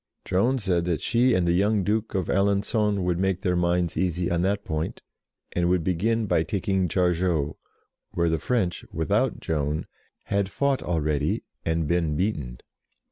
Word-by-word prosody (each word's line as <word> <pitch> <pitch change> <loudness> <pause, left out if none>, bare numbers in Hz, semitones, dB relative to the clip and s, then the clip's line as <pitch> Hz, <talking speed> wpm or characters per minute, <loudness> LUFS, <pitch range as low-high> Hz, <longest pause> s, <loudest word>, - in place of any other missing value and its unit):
Joan 115 +9 +2
said 90 -7 0
that 85 -3 0
she 120 +1 +3
and 90 -2 +1
the - - +3
young 100 +2 +2
Duke 105 +2 -1
of 95 -3 0
Alengon 100 +1 +1
would 90 -1 0
make 95 -1 0
their 90 -3 +1
minds 85 -1 +1
easy 90 -1 0
on 85 0 +1
that 100 +2 0
point, 80 -2 -3 0.5
and 85 0 +1
would 90 -2 +2
begin 110 +6 +1
by 90 - +2
taking 95 +2 0
Jargeau, 85 -4 +1 0.5
where 85 0 0
the 80 -1 +1
French, 110 -9 -1
without 80 -2 0
Joan, 75 -1 -1 0.4
had 100 -1 0
fought 140 +5 0
already 75 +3 0 0.2
and 80 -1 0
been 85 -2 +1
beaten. 75 - -2
90 Hz, 160 wpm, -25 LUFS, 85-100 Hz, 0.5 s, she